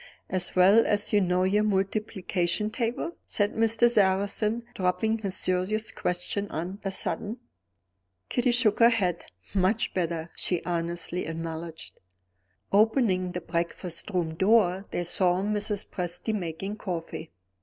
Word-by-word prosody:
"As 185 -1 -1
well 195 +5 +6
as 205 0 +2
you 205 - +5
know 180 0 +2
your 205 +3 +2
multiplication 195 -1 -1
table?" 235 +7 -2 0.2
said 205 -1 0
Mr. 225 +1 +4
Sarrazin, 210 +1 +1
dropping 220 +3 0
his 195 -3 -2
serious 185 +4 +1
questions 180 +3 -2
on 180 +5 -4
a 195 - -1
sudden. 210 +3 -2 0.9
Kitty 245 0 +1
shook 240 -3 +2
her 230 0 +8
head. 185 -7 0 0.3
"Much 200 +4 +1
better," 170 -2 -2
she 180 -2 0
honestly 170 +1 -2
acknowledged. 165 0 -6 0.7
Opening 200 -4 +3
the 180 - -3
breakfast 170 +1 -3
room 175 -5 -1
door 190 +1 +3
they 175 - -2
saw 180 +1 +2
Mrs. 210 0 -1
Presty 180 +5 -3
making 195 +2 -4
coffee. 165 -5 -5
190 Hz, 130 wpm, -27 LUFS, 175-215 Hz, 0.9 s, her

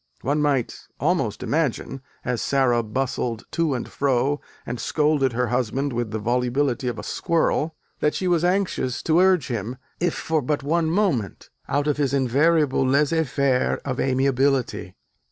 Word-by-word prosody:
One 145 +4 0
might 140 -5 0 0.2
almost 150 - 0
imagine, 135 -3 -1 0.2
as 125 -2 -1
Sara 130 -4 +2
bustled 120 0 -2
to 165 -5 0
and 120 - -4
fro 140 +1 0 0.2
and 120 0 -4
scolded 150 -4 +1
her 125 +1 0
husband 130 +3 -1
with 120 -1 -2
the 110 - -3
volubility 125 +4 0
of 120 -2 -2
a - - -6
squirrel, 165 -2 0 0.2
that 150 - +1
she 185 - -1
was 175 -2 +2
anxious 180 -8 0
to 160 +1 +3
urge 185 -6 +3
him, 120 +1 -3 0.2
if 175 -1 -2 0.2
but 145 +3 -1
for - - -8
one 165 +1 +2
moment, 160 - -1 0.2
out 145 +1 +1
of 150 -1 0
his 140 -2 +1
invariable 140 +2 +2
laisser 150 +5 +2
faire 135 -1 +1
of 130 -2 -3
amiability.... 135 0 +1
135 Hz, 155 wpm, -23 LUFS, 125-155 Hz, 0.2 s, to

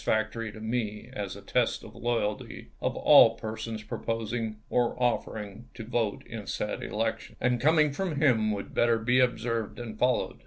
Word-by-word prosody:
factory 110 0 -1
to 110 - -11
me 110 0 -3
as 100 -6 -4
a - - -10
test - - 0
of - - -11
loyalty 115 -3 -2
of - - -1
all 115 - +7
persons 110 0 -5
proposing, 115 0 -3
or 120 -1 +1
offering, 110 -3 -2
to 115 - -6
vote 115 -3 -1
in 110 -4 -7
said 105 - -3
elections; 110 +1 -3
and 125 -1 +1
coming 155 0 +4
from 180 0 -2
him 125 -7 +3
would 100 -2 -4
better 120 -1 +3
be 120 +3 +2
observed 115 -4 0
and 110 -3 -7
followed. 125 0 +1
115 Hz, 165 wpm, -28 LUFS, 110-120 Hz, -, all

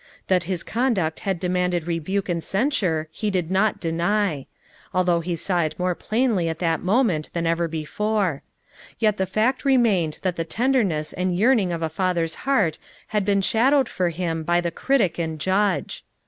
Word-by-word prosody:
That 180 -3 +2
his 180 -3 -2
conduct 220 -9 0
had 190 -3 -2
de 180 - -2
manded 180 -2 0
rebuke 175 +4 -2
and 170 -2 -2
censure 195 - 0
he 215 - -2
did 180 -3 -1
not 200 +3 +2
deny, 170 -2 0 0.2
— - - -28
although 180 -2 +3
he 170 +1 -3
saw 175 +1 0
it 155 -2 -2
more 180 0 0
plainly 215 -4 0
at 160 - -3
that 165 -2 0
mo 215 +9 +3
ment 160 -10 -1
than 170 -1 -1
ever 165 +1 +1
before,— 175 +2 -1 0.6
yet 215 -2 +2
the 190 - 0
fact 235 +7 0
remained 225 - +2
that 185 -2 -1
the 165 - 0
tenderness 200 - 0
and 180 -1 -1
yearning 215 -3 +3
of 165 -1 -3
a - - +1
father's 170 0 -1 0.2
heart 200 - +2 0.3
had 210 -2 0
been 200 0 +2
shadowed 260 +6 +3
for 180 -5 -1
him 165 -1 -2
by 175 +2 +2
the 175 -1 -2
critic 195 -6 +1
and 160 -2 -3
judge. 195 +5 0
180 Hz, 185 wpm, -23 LUFS, 165-210 Hz, 0.6 s, although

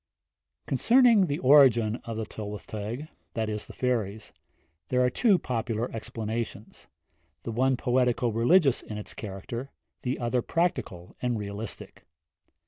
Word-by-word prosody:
I. - - -13
Concerning 235 -6 +5
the 145 -1 -1
origin 125 -5 +5
of 115 -1 -5
the 110 - -2
Tylwyth 105 -5 -7
Teg, 110 +8 -5 0.3
there 110 - -3
are - - +3
two 210 - +4
popular 115 -4 -2
explanations, 110 -1 -5 0.6
the 115 - -4
one 130 +3 +2
poetico 125 -1 +1
religious 130 - +3
in 105 - -7
its 105 - -7
character, 110 +6 -6 0.3
the 125 +1 -2
other 120 0 0
practical 125 - -2
and 125 -2 0
realistic. 105 +1 -7
115 Hz, 120 wpm, -27 LUFS, 105-130 Hz, 0.6 s, Concerning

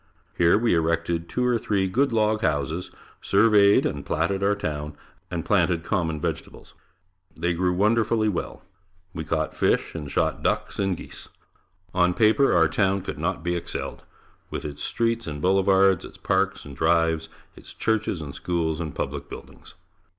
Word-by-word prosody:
Here 85 +3 +4
we 115 +1 +2
erected 85 0 0
two 125 - -1
or 120 -2 +2
three 100 -3 0
good 130 +9 +1
log 110 -1 +1
houses, 80 +1 -1 0.3
surveyed 100 -1 +4
and 70 - -2
platted 85 +5 -1
our 100 +1 +2
town, 75 -6 -4 0.3
and - - -4
planted 85 -3 +2
common 85 -4 -1
vegetables. - - -5 0.6
They 85 +2 0
grew 90 +1 +1
wonderfully 110 +3 +2
well. 100 -5 -3 0.5
We 80 - -4
caught 80 0 -2
fish - - +1
and 75 -3 -6
shot - - 0
ducks - - -1
and 95 -3 0
geese. - - -10 0.6
On 90 -1 +2
paper 115 +5 +4
our 80 -2 +4
town 95 +4 +1
could - - -6
not 85 +1 -2
be 85 0 0
excelled, 85 - -5 0.5
with - - -5
its 75 -1 -6
streets 115 -2 -1
and 75 -2 -5
boulevards, 95 +1 +3
its - - -11
parks - - 0
and 70 -1 -9
drives, 80 0 +1 0.3
its - - -13
churches 110 -6 -1
and 70 -2 -7
schools 85 -3 -2
and 80 -3 -5
public - - -4
buildings. - - -11
90 Hz, 160 wpm, -25 LUFS, 80-105 Hz, 0.6 s, Here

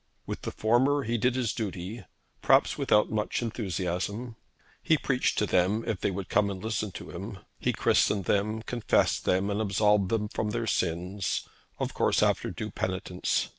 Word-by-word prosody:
With - - -5
the - - -4
former 130 +6 +2
he 115 0 -1
did 125 +2 +2
his 125 -3 0
duty, 100 0 -5 0.4
perhaps - - +4
without 105 - +3
much 110 +2 -1
enthusiasm. 100 +1 -3 0.5
He 160 - +3
preached 130 -3 0
to 105 - +3
them, 95 +4 +2
if 105 -5 -2
they - - +1
would 95 0 -4
come 105 -1 +2
and 95 -1 -5
listen 110 0 -2
to - - -8
him. 100 +4 -6 0.2
He - - +1
christened 100 -3 +2
them, 110 +4 0
confessed 120 -1 +1
them, 95 +2 +2
and 100 +2 0
absolved 105 -1 +3
them 110 -2 0
from 105 - -2
their 115 +2 -2
sins, 90 0 -1 0.3
of - - -3
course, - - +2
after - - +1
due 110 -1 -5
penitence. 95 -2 -1
105 Hz, 170 wpm, -28 LUFS, 95-115 Hz, 0.5 s, perhaps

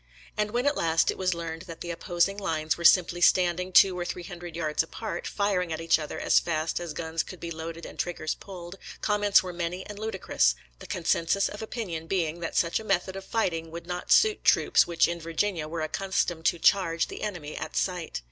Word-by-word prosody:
And 210 0 0
when 240 +4 -1
at 285 0 +3
last 165 0 +2
it - - -8
was 185 -2 +1
learned 165 -1 -5
that 165 -2 -9
the 175 - -4
opposing 175 +3 0
lines 160 -5 -1
were 170 - -7
simply 175 0 +5
standing 180 +1 +3
two 185 0 +6
or - - -1
three 175 0 -5
hundred 175 -2 -8
yards 155 -2 0
apart, 215 +7 -5
firing 195 -4 0
at 160 - -2
each 165 0 +3
other 150 - -5
as - - +4
fast 160 -1 -1
as 170 -3 -5
guns 160 +1 -2
could 185 - -9
be 170 - -6
loaded 165 +1 -6
and - - -11
trig 175 -1 -2
gers 155 - -2
pulled, 185 -1 -10 0.2
comments 205 -2 +4
were 180 -1 -6
many 175 +2 -3
and 205 -1 -8
ludicrous 190 - +1
— - - -35
^the - - -11
consensus 175 +2 +1
of 205 - -8
opinion 190 -8 -5
being 170 -3 -1
that 165 - -4
such 170 -1 +2
a - - -8
method 190 -2 0
of 195 - -6
fighting 165 -8 -1
would 170 +1 -8
not 180 0 -5
suit 435 -1 +5
troops - - +4
which 170 -1 +3
in 170 0 -4
Virginia 165 0 -1
were 165 +1 -4
accustomed 175 0 -1
to - - +3
charge 170 -2 +3
the - - -8
enemy 175 -8 -5
at - - -6
sight. 180 -3 -1
175 Hz, 220 wpm, -27 LUFS, 165-190 Hz, 0.2 s, two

